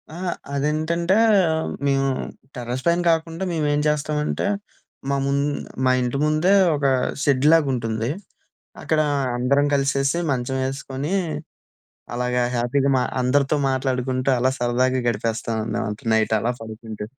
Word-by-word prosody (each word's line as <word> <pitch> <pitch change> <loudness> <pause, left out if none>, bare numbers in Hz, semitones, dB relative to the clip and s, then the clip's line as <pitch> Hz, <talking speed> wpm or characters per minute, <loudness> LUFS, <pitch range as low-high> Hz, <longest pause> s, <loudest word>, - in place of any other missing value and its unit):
ఆ! - - -7 0.4
అదేంటంటే 160 +6 0 0.7
మేము 135 0 +2 0.5
టెర్రస్‌ 125 +1 -4
పైన 170 +1 +3
కాకుండా 165 +2 -2
మే‌మేం 150 -2 +1
చేస్తామంటే, 150 +2 -1 0.6
మా 140 - +1
ముం 140 0 +1 0.5
మా 130 - +4
ఇంటి 125 +2 -1
ముందే 155 +6 +3 0.2
ఒక 140 -1 -2 0.4
షెడ్‌లాగా 150 +2 +4
ఉంటుంది. 115 0 -2 0.7
అక్కడ 155 -1 +1 0.4
అందరం 140 +3 +2
కలిసేసి 140 +2 +1
మంచం 130 +1 -1
ఎసుకొని 135 +4 -4 1.0
అలాగా 125 0 0
హ్యాపీగా 135 +4 +1
మా - - +1 0.2
అందరితో 140 +3 +2
మాట్లాడుకుంటూ, 130 0 0
అలా 130 +2 +2
సరదాగా 125 +2 +1
గడిపేస్తాం 115 0 -1 0.2
న - - -1 0.3
నైట్ 110 0 +2
అలా 120 +2 0
పడుకుం‌టూ. 110 -1 -7
135 Hz, 115 wpm, -22 LUFS, 125-150 Hz, 1.0 s, మా